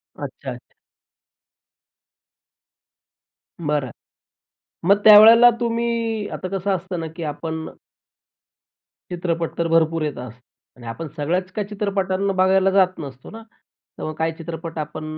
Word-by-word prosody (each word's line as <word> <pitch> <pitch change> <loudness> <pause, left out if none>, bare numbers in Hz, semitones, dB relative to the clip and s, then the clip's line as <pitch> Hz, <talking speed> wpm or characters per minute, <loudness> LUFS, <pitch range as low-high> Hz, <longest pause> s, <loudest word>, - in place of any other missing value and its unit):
अच्छा, - - -7
अच्छा. - - -12 2.9
बरं. 145 -4 0 1.0
मग 200 - +7
त्यावेळेला 225 +3 +9
तुम्ही 230 -2 -1
आता 185 - -5
कसं 195 +2 -2
असतं 185 -1 -5
ना 165 - -4
की 170 - -6
आपण 160 +2 -5 1.5
चित्रपट 170 -2 -3
तर 170 0 0
भरपूर 165 0 +2
येत 150 - -3
असतात. 125 -1 -9 0.4
आणि 120 - -13
आपण 160 +8 -6
सगळ्याच 175 +5 -2
काही 205 0 -4
चित्रपटांना 195 -2 -1
बघायला 190 +1 +3
जात 185 -2 +2
नसतो 135 -4 -9
ना? 225 - -10 0.6
तर - - -7
मग 155 - -3
काही 160 0 -1
चित्रपट 165 0 -7
आपण 155 +1 -5
175 Hz, 125 wpm, -21 LUFS, 160-200 Hz, 2.9 s, त्यावेळेला